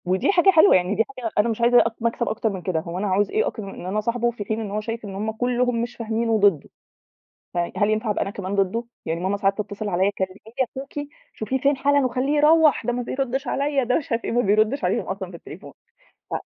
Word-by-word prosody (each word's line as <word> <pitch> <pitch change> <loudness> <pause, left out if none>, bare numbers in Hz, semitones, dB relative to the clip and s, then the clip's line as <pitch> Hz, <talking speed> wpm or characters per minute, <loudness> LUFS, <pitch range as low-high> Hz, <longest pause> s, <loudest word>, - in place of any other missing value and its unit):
ودي 185 - +2
حاجة 375 0 +4
حلوة، 365 +1 +7
يعني 185 +3 +1
دي 225 - +3
حاجة 235 -3 -3
أنا 210 +3 +3
مش 225 +1 -3
عايزة 240 +1 +6
أ 230 -1 -1
مكسب 230 +1 -1
أكتر 220 +1 -1
من 190 -3 -5
كده، 175 -2 -1
هو 170 +1 -6
أنا 205 +2 -1
هاعوز 195 +2 +1
إيه 440 +3 +1
أكتر 220 - -5
إن 195 -2 -8
أنا 195 +3 -1
أصاحبُه 235 +2 0
في 215 -3 -7
حين 220 +2 -2
إن 210 -2 -5
هو 210 +1 -2
شايف 225 +1 -5
إن 195 -2 -7
هم 215 +3 -2
كلهم 245 +1 0
مش 240 +1 -4
فاهمينُه 230 0 -2
وضدُّه، 200 -8 +3 0.8
ف - - -5
هل 175 +4 0
ينفع 215 0 0
أبقى - - -1
أنا - - -1
كمان 195 0 -4
ضدُّه! 200 +4 0 0.2
يعني 165 +1 -2
ماما 190 +3 -1
ساعات 195 0 +1
تتصل 210 0 -4
عليَّ 190 +2 +2
كلّمي 190 -2 -4 0.2
لي 260 - +4
أخوكِ 285 +2 -6 0.3
شوفيه 220 +5 -2
فين 280 +1 +2
حالًا 285 0 +2
وخلّيه 260 +4 0
يروَّح، 305 0 +4
ده 245 - 0
ما 245 - -2
بيردِّش 265 +2 -3
عليَّ 280 -1 0
ده 250 - +2
مش 295 - -6
عارف 230 0 -1
إيه، - - -2
ما 240 +1 +2
بيردش 215 +6 +2
عليهم 180 - 0
أصلًا 190 -1 -5
في 180 - -10
التليفون 170 +4 -12 0.6
ف - - -6
225 Hz, 250 wpm, -23 LUFS, 195-250 Hz, 0.8 s, حلوة